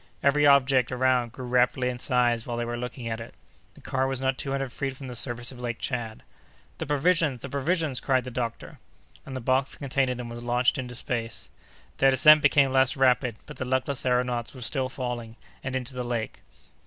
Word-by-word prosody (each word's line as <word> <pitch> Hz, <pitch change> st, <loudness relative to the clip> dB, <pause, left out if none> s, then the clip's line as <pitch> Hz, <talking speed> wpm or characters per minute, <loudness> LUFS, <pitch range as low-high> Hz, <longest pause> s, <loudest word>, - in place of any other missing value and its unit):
Every 145 Hz, +1 st, +4 dB
object 135 Hz, -3 st, +4 dB
around 125 Hz, -2 st, +1 dB
grew 125 Hz, +1 st, -8 dB
rapidly 125 Hz, +1 st, +2 dB
in 125 Hz, -1 st, -3 dB
size 120 Hz, -2 st, +1 dB
while 120 Hz, -1 st, -3 dB
they 120 Hz, -, -1 dB
were 120 Hz, 0 st, -3 dB
looking 125 Hz, 0 st, -6 dB
at 115 Hz, 0 st, -3 dB
it. 115 Hz, -, -10 dB, 0.4 s
The -, -, -16 dB
car 130 Hz, 0 st, -1 dB
was 135 Hz, -1 st, -2 dB
not 130 Hz, 0 st, 0 dB
two 135 Hz, -, -4 dB
hundred 135 Hz, -2 st, -2 dB
feet 135 Hz, +1 st, -4 dB
from 135 Hz, -, -8 dB
the 125 Hz, -, -7 dB
surface 120 Hz, +1 st, 0 dB
of 125 Hz, -2 st, -11 dB
Lake 120 Hz, -1 st, -3 dB
Tchad. 115 Hz, -4 st, -4 dB, 0.6 s
"The -, -, -4 dB
provisions! 150 Hz, -3 st, +1 dB
the 140 Hz, -, -5 dB
provisions!" 145 Hz, 0 st, 0 dB
cried 130 Hz, -2 st, +1 dB
the 125 Hz, -, -7 dB
doctor. 120 Hz, -1 st, -5 dB, 0.5 s
And 135 Hz, -, -6 dB
the -, -, -3 dB
box 130 Hz, +3 st, +1 dB
containing 135 Hz, -2 st, 0 dB
them 125 Hz, -1 st, -6 dB
was 120 Hz, 0 st, -7 dB
launched 125 Hz, +2 st, +1 dB
into 125 Hz, -1 st, -5 dB
space. 115 Hz, -1 st, -4 dB, 0.5 s
Their 135 Hz, -, +5 dB
descent 150 Hz, +3 st, +7 dB
became 140 Hz, -1 st, +4 dB
less 130 Hz, +1 st, +3 dB
rapid, 125 Hz, -3 st, +3 dB
but -, -, -11 dB
the -, -, -3 dB
luckless 130 Hz, +1 st, 0 dB
aëronauts 125 Hz, -1 st, 0 dB
were 130 Hz, -, -10 dB
still 130 Hz, +2 st, 0 dB
falling, 120 Hz, -4 st, -5 dB, 0.3 s
and 130 Hz, 0 st, -3 dB
into 130 Hz, 0 st, -3 dB
the 125 Hz, -, -4 dB
lake. 120 Hz, -2 st, -4 dB
125 Hz, 205 wpm, -26 LUFS, 120-135 Hz, 0.6 s, descent